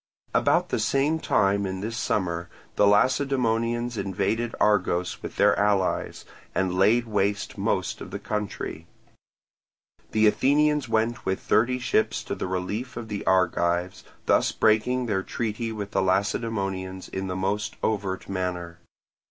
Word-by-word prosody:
About - - +2
the - - 0
same 145 +4 +1
time 100 -7 +2
in 95 0 -4
this 115 +3 -4
summer, 90 -6 -1 0.3
the 105 - +4
Lacedaemonians 120 0 +1
invaded 100 +4 -1
Argos 90 -4 +1
with - - -7
their - - +4
allies, 100 -2 0 0.3
and 95 -1 +1
laid 110 +6 +3
waste 100 -2 -1
most - - -1
of - - -7
the - - -5
country. 105 -6 -4 1.2
The 110 0 +3
Athenians 145 +4 +3
went 115 +1 0
with 95 0 -1
thirty 125 +3 +2
ships 120 -3 0
to - - -4
the - - -3
relief 100 +7 -3
of 115 -2 -6
the 105 -1 -4
Argives, 90 -1 +1 0.2
thus - - +3
breaking 125 +4 +2
their 100 -5 0
treaty 115 +2 -3
with 105 -2 -5
the - - +1
Lacedaemonians 95 -1 -1
in 95 0 -4
the 90 - -3
most 105 +4 -2
overt 100 -3 -1
manner. 90 -3 -4
105 Hz, 140 wpm, -26 LUFS, 95-115 Hz, 1.2 s, the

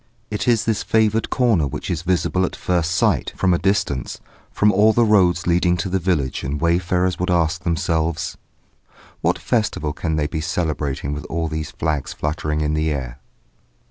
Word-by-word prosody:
It 105 0 -2
is 115 -2 +3
this 110 -3 0
favoured 110 0 +1
corner 110 - +2
which - - -5
is 85 -3 -2
visible 90 +1 0
at 95 - -2
first 85 -2 0
sight, 85 - +1
from 95 -1 +2
a 85 - +1
distance, 95 -8 -1 0.3
from 105 0 +3
all 105 +3 +4
the 120 +1 +3
roads 90 -5 +3
leading 90 0 +2
to 85 +3 -2
the 95 +1 0
village, 80 -8 -1
and 70 +2 -3
wayfarers 90 +2 +1
would 90 +1 -1
ask 85 0 +1
themselves: 80 -2 -1 0.9
"What - - +1
festival 110 - -1
can 80 +1 -2
they 75 -1 0
be 80 +1 -3
celebrating 75 -4 -2
with 75 - -6
all 80 0 -2
those 80 -1 -4
flags 75 -3 -2
fluttering 75 0 -2
in 75 0 0
the 80 +1 0
air?" 65 -4 -4
85 Hz, 175 wpm, -21 LUFS, 75-95 Hz, 0.9 s, all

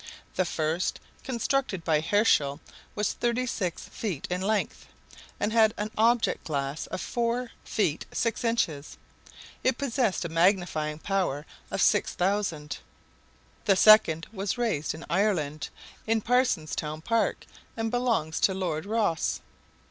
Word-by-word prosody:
The 185 - +2
first, 160 +2 -1 0.2
constructed 250 -6 -1
by 155 -2 +2
Herschel, 160 -6 +3 0.4
was 210 0 0
thirty 240 +1 0
six 185 -8 -3
feet 185 -11 -4
in 180 +1 -1
length, 210 +2 -1 0.5
and 210 +2 0
had 220 -1 +5
an 210 +1 -3
object 230 +1 +2
glass 140 -1 -2
of - - -4
four 240 +2 -1
feet 175 -8 -1
six 230 +1 -1
inches; 170 -11 -1 0.7
it 255 -1 +2
possessed 240 -9 0
a - - 0
magnifying 165 -3 +1
power 175 -5 -1 0.2
of - - 0
6,000. 180 -6 +1 0.9
The 200 -3 +5
second 185 -6 +6
was 200 +3 -2
raised 205 -12 -1
in 160 - -9
Ireland, 170 -5 0 0.4
in 225 0 +3
Parsonstown 160 - 0
Park, 230 +3 0 0.3
and 225 0 -1
belongs 230 -11 0
to 190 - +3
Lord 180 -2 -2
Rosse. 210 -7 0
195 Hz, 125 wpm, -28 LUFS, 160-225 Hz, 0.9 s, second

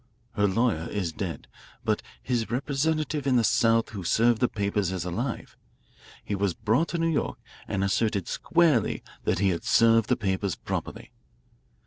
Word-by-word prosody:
Her 105 -1 +1
lawyer 100 -5 0
is 95 -5 -2
dead, 85 -2 -5 0.4
but - - +1 0.2
his 120 -3 -1
representative 145 +3 -1
in 130 - +3
the 120 - +4
South 115 +1 +3
who 100 -4 -6
served 115 +5 +3
the 125 - +3
papers 100 -3 -1
is 90 -3 -3
alive. 115 +9 -4 0.7
He - - -3
was 100 -3 0
brought 115 +10 +1
to 170 - -3
New 165 - 0
York 150 - -1 0.3
and 95 - -1
asserted 100 -1 0
squarely 170 -4 +2 0.2
that - - +1
he 100 +2 +2
had 85 -2 -2
served 115 -1 +4
the 125 - +3
papers 95 -3 -1
properly. - - -5
110 Hz, 160 wpm, -27 LUFS, 95-125 Hz, 0.7 s, the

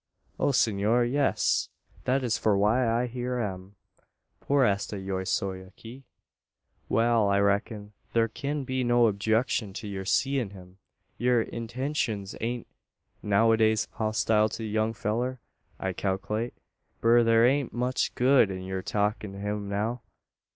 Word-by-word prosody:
"O, - - +2
senor 115 -1 +2
yees 135 +3 +1 0.4
that 130 +1 +1
is 115 -3 +1
for 110 -2 +2
why 115 +4 +2
I 120 +2 +1
here 125 +1 -3
am 95 -2 -5 0.6
por 140 -2 +2
esta 100 -1 -1
yo 95 -1 -3
soy 95 0 -2
aqui." 115 +7 -13 0.8
"Wal; 115 -2 +3
I 100 - +3
reck'n, 100 +1 0 0.2
thur 115 -1 +2
kin 140 +5 -4
be 130 0 -2
no 120 -1 +4
objecshun 110 0 0
to 105 - -6
yur 95 -1 -5
seein' 130 -1 0
him. 90 0 -14 0.4
Yur 120 -1 +3
intenshuns 115 -3 -3
ain't 120 +1 -3 0.6
noways 110 +1 +3
hostile 110 0 +1
to 115 - -6
the - - -3
young 110 +1 0
fellur, 120 +5 -2 0.4
I 95 -1 -2
kalklate. 105 +5 -2 0.5
But 120 +1 +4
thur 115 0 +5
ain't 135 +1 +2
much 125 +2 -1
good 125 -3 +4
in 95 -1 -5
yur 95 0 -4
talkin' 105 0 -1
to - - -9
him 105 0 -3
now. 110 +4 -2
110 Hz, 145 wpm, -27 LUFS, 100-120 Hz, 0.8 s, thur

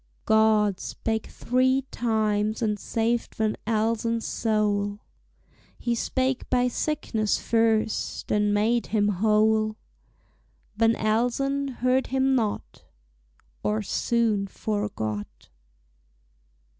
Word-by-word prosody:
God 215 -3 +3
spake 220 -1 -3
three 260 +2 +1
times 215 -1 0
and 210 -2 0
saved 230 +3 -1
Van 215 -1 0
Elsen's 230 +1 0
soul; 205 -2 0 0.8
He 240 - -1
spake 260 +2 -1
by 250 -1 +2
sickness 235 -6 -1
first 225 -1 0
and 210 0 +2
made 225 +3 +1
him 210 -2 +1
whole; 215 +2 +2 1.0
Van 225 +1 +3
Elsen 245 +6 0
heard 255 +1 +2
him 265 0 +1
not, 225 -5 -2 0.8
Or 105 0 -1
soon 220 - 0
forgot. 110 - -4
220 Hz, 95 wpm, -26 LUFS, 210-235 Hz, 1.0 s, God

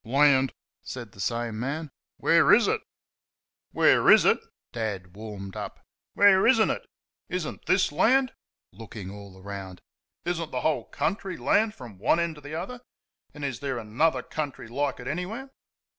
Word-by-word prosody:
"LAND!" 135 +1 +4 0.3
said 120 -5 -7
the 100 - -18
same 115 +1 -2
man 145 +4 -3 0.3
"where - - +4
IS - - +6
it?" - - +1 0.9
"Where - - +4
IS - - +8
it?" - - +4 0.3
Dad 100 -6 -4
warmed 100 -3 -8
up - - -6 0.4
"where 200 -1 +6
IS 260 0 +6
N'T 220 - +3
it? - - -5 0.4
Is 180 -3 -2
n't - - -8
this 185 -2 +3
land?" 255 - +3 0.4
(Looking 100 -1 -9
all 100 -2 -11
round.) 95 -2 -7 0.5
"Is 175 -1 -1
n't 160 - -5
the - - -3
whole 160 -2 0
country 190 0 -2
land 215 0 +2
from 115 -7 -11
one 125 - +3
end 170 -1 0
to 150 - -14
the 145 +2 -7
other? 215 +9 -5 0.5
And 145 -1 -5
is 135 -4 -3
there 135 -3 -3
another 120 +9 +1
country 145 -6 -5
like 140 +3 -2
it - - -8
anywhere?" 210 - -4
140 Hz, 170 wpm, -27 LUFS, 110-175 Hz, 0.9 s, IS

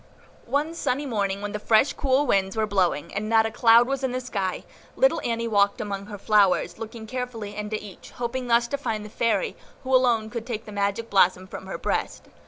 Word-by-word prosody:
One 295 +4 0
sunny 285 -3 -1
morning, 200 -5 -2
when 205 - -3
the 210 - -4
fresh, 225 +6 +3
cool 270 +1 +1
Winds 195 -4 +1
were 220 - +2
blowing, 180 -6 0
and 215 +2 -3
not 225 -1 +4
a 225 - -2
cloud 230 +1 +5
was 275 0 -2
in 260 -2 -1
the 255 - -1
sky, 200 -7 -3 0.3
little - - +3
Annie 230 0 -1
walked 200 -2 +2
among 200 -1 -4
her 210 -1 -7
flowers, 200 -4 +2
looking 225 0 -7
carefully 230 -3 -5
into 210 0 -3
each, 200 -4 -12
hoping 245 +1 -4
thus 235 0 +3
to 280 - -2
find 215 -6 -3
the - - -9
Fairy, 230 - 0 0.3
who 260 0 +2
alone 235 -4 +2
could 235 -1 -5
take 230 -2 -4
the 210 - -9
magic 200 +3 -2
blossom 185 -1 +3
from 190 0 -9
her 190 - -4
breast. - - -2
220 Hz, 210 wpm, -25 LUFS, 200-250 Hz, 0.3 s, cloud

